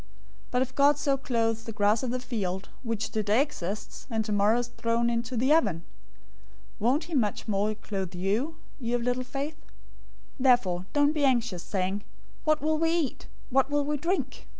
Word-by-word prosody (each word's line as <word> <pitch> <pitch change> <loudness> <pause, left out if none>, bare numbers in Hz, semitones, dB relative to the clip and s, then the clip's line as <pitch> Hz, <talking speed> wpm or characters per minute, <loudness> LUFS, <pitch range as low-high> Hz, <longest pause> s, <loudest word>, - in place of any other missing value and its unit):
006:030 - - -25 0.4
But 250 - +1
if 260 0 -8
God 285 +1 +5
so 280 -1 +2
clothes 230 -4 0
the 225 - -5
grass 210 +1 +2
of 255 - -2
the 255 +1 -1
field, 200 -7 -3
which 230 -3 -2
today 215 +1 +2
exists, 215 - -3
and 220 -2 0
tomorrow 210 +1 +3
is 240 0 -2
thrown 235 0 0
into 235 +1 -2
the 260 +6 +4
oven, 200 - +2 1.0
won't 250 +8 +2
he 340 - -8
much 225 -7 0
more 210 +1 +1
clothe 190 -4 -4
you, 210 - 0 0.2
you 240 -1 -1
of 240 - -1
little 250 +1 0
faith? 285 +4 -4
006:031 - - -27 0.8
"Therefore 190 -9 +4
don't 290 0 +4
be 300 -2 0
anxious, 240 -9 +2
saying, 195 +2 -2 0.4
'What 310 -1 +3
will 310 0 +2
we 325 0 +3
eat?', 330 -5 -1 0.2
'What 270 +1 +3
will 290 0 +1
we 300 +1 0
drink?' 340 +7 -2
235 Hz, 185 wpm, -28 LUFS, 210-275 Hz, 1.0 s, God